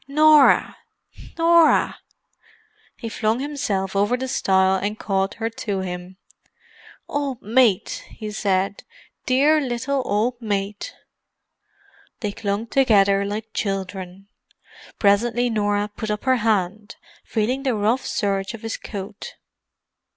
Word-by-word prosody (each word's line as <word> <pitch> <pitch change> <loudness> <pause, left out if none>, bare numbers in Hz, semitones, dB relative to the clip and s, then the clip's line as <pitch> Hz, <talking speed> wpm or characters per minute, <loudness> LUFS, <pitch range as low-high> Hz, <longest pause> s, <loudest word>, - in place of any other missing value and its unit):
"Norah! 300 0 +5 0.6
Norah!" 335 -1 +4 1.0
He 235 - -6
flung 220 +1 -1
himself 210 -10 -2
over 205 +5 +2
the 260 +1 -4
stile 190 -6 +2
and 210 +2 -2
caught 195 -2 -1
her 225 0 -2
to 205 -3 -3
him. 180 0 -6 0.9
"Old 280 -4 -3
mate!" 225 -3 +2
he 215 -1 -7
said. 195 -1 -1 0.4
"Dear 290 +4 +4
little 260 +1 -1
old 235 +4 0
mate!" 205 -2 -3 1.3
They 210 -3 -2
clung 200 +1 -3
together 200 -6 +3
like 215 +2 -5
children. 195 -1 -4 0.7
Presently 235 +4 +2
Norah 205 -1 0
put 220 - -5
up 210 0 -2
her 260 -1 +3
hand, 210 0 -1 0.3
feeling 245 +5 -1
the 260 -4 0
rough 220 +5 +1
serge 195 0 -2
of 225 - -13
his 225 - -3
coat. 200 0 -8
215 Hz, 115 wpm, -22 LUFS, 200-250 Hz, 1.3 s, Norah